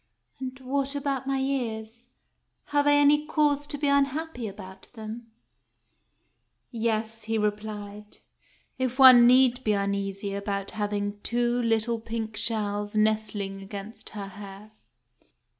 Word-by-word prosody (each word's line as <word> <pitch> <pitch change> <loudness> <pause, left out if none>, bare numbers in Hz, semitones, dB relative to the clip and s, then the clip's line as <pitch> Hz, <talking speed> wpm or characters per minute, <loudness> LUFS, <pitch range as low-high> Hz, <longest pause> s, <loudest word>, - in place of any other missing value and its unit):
"And 260 0 -6
what 275 +2 -2
about 275 -2 -2
my 275 0 0
ears? 240 -3 -3 0.7
Have 290 0 +3
I 290 - +6
any 290 +1 +5
cause 290 -2 +1
to 290 - -5
be 290 0 -1
un 280 0 +4
happy 280 -4 -5
about 190 -1 -11
them? 225 +1 -8 0.7
" - - -46 0.6
"Yes," 225 -1 -2
he 225 0 -1
replied, 210 0 -4 0.6
"if 255 -1 -1
one 255 -3 +9
need 255 0 +5
be 215 - +2
uneasy 200 0 -2
about 200 0 -3
having 205 -1 -3
two 240 +1 0
little 230 0 +1
pink 225 -1 -5
shells 210 -2 -1
nestling 215 -2 0
against 200 +3 -8
her 200 - -4
hair." 200 +1 -11
225 Hz, 130 wpm, -27 LUFS, 205-260 Hz, 0.7 s, one